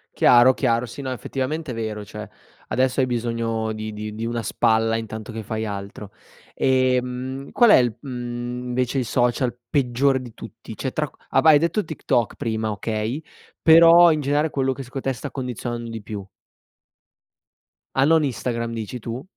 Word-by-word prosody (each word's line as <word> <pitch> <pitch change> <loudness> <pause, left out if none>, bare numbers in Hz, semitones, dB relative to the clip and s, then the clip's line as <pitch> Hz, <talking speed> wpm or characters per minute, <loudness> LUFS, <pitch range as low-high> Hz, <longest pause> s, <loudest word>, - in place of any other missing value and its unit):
Chiaro, 120 +2 +6
chiaro. 120 -2 +1
Sì, 120 +4 -9
no, 130 -1 -4
effettivamente 135 +3 -3
è - - -4
vero, 110 -2 -4
cioè, 105 -1 -8 0.4
adesso 130 +1 +1
hai 130 - +3
bisogno 115 -2 -2
di 110 0 -5
di 105 0 -6
di 115 +2 -4
una 120 0 -3
spalla 110 +2 +2
intanto 110 0 -5
che 110 - -5
fai 110 +1 -4
altro. 100 0 -7 0.4
Ehm, 130 +1 0
qual 235 -3 +5
è - - +9
il, 120 -4 +1
mhmm, 125 -1 -5
invece, 125 +2 0
il 125 - -1
social 120 +1 0
peggiore 135 -1 +2
di 120 -3 -11
tutti? 115 -1 -10
Cioè 130 - -3
tra 150 -2 -1
q - - -27 0.2
av 135 - +3
hai 150 -2 +8
detto 170 +7 0
TikTok 120 -6 -1
prima, 110 -1 -2
okay, 110 +7 -3 0.4
però 165 +1 +8
in 155 -1 0
generale 145 +2 +1
quello 135 -1 0
che 135 - -7
secondo 130 +2 -6
te 135 - -1
sta 140 +3 -7
condizionando 120 -2 -5
di 115 -1 -6
più. 105 -2 -6 1.7
Ah, 135 - +4
non 160 0 +4
Instagram, 115 -3 -2
dici 115 +2 -5
tu? 115 +4 -6
120 Hz, 175 wpm, -23 LUFS, 115-135 Hz, 1.7 s, è